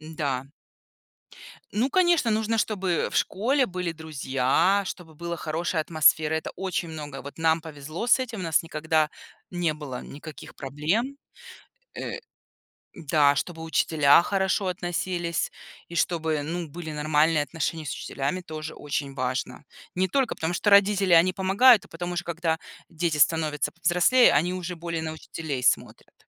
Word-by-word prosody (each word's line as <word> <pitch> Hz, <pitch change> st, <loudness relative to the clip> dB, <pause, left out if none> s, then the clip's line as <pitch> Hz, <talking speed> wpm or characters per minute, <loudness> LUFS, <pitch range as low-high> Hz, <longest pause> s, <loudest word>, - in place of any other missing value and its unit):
Н-да. 145 Hz, -4 st, -3 dB, 1.3 s
Ну, 240 Hz, +6 st, +1 dB
конечно, 345 Hz, -9 st, +3 dB
нужно, 220 Hz, +1 st, 0 dB
чтобы 190 Hz, -5 st, 0 dB
в -, -, -3 dB
школе 255 Hz, +7 st, +1 dB
были 180 Hz, -2 st, -3 dB
друзья, 160 Hz, +4 st, +1 dB
чтобы 160 Hz, -4 st, -8 dB
была 170 Hz, +2 st, -5 dB
хорошая 160 Hz, +1 st, -2 dB
атмосфера. 155 Hz, 0 st, +3 dB
Это 160 Hz, -, -3 dB
очень 185 Hz, -3 st, -3 dB
много. 150 Hz, -3 st, -7 dB
Вот 140 Hz, +3 st, -10 dB
нам 160 Hz, 0 st, +2 dB
повезло 155 Hz, +5 st, -6 dB
с 245 Hz, -, +5 dB
этим. 240 Hz, -5 st, -4 dB
У -, -, -4 dB
нас 165 Hz, -3 st, +2 dB
никогда 155 Hz, -1 st, 0 dB, 0.4 s
не 175 Hz, -3 st, 0 dB
было 140 Hz, -5 st, -7 dB
никаких 150 Hz, +2 st, -10 dB
проблем. 165 Hz, -, -2 dB, 0.8 s
Э 465 Hz, -, -5 dB, 0.8 s
да, 145 Hz, -2 st, +3 dB
чтобы 165 Hz, +3 st, -4 dB
учителя 160 Hz, -1 st, +4 dB
хорошо 190 Hz, 0 st, 0 dB
относились, 175 Hz, -1 st, -2 dB, 0.4 s
и 170 Hz, -, -7 dB
чтобы, 160 Hz, -4 st, 0 dB
ну, 170 Hz, +1 st, -4 dB
были 160 Hz, +1 st, -7 dB
нормальные 150 Hz, +1 st, +2 dB
отношения 160 Hz, +2 st, -3 dB
с -, -, -3 dB
учителями- 140 Hz, +7 st, -3 dB
тоже 155 Hz, -2 st, -7 dB
очень 140 Hz, -1 st, -4 dB
важно. 130 Hz, +2 st, -3 dB, 0.3 s
Не 185 Hz, +1 st, +2 dB
только 255 Hz, +6 st, 0 dB
потому, 160 Hz, +2 st, -2 dB
что 205 Hz, -, +1 dB
родители- 200 Hz, -2 st, +5 dB
они 170 Hz, +2 st, +6 dB
помогают, 200 Hz, +5 st, +5 dB
а -, -, -17 dB
потом 175 Hz, +1 st, -5 dB
уже 175 Hz, 0 st, -2 dB
когда 170 Hz, -1 st, -1 dB, 0.3 s
дети 165 Hz, -2 st, -1 dB
становятся 150 Hz, -1 st, +2 dB
повзрослее, 175 Hz, +8 st, +4 dB
они 170 Hz, +6 st, +2 dB
уже 180 Hz, -1 st, -5 dB
более 165 Hz, -1 st, -4 dB
на 160 Hz, -, -3 dB
учителей 155 Hz, -3 st, -5 dB
смотрят. -, -, 0 dB
165 Hz, 150 wpm, -26 LUFS, 155-185 Hz, 1.3 s, они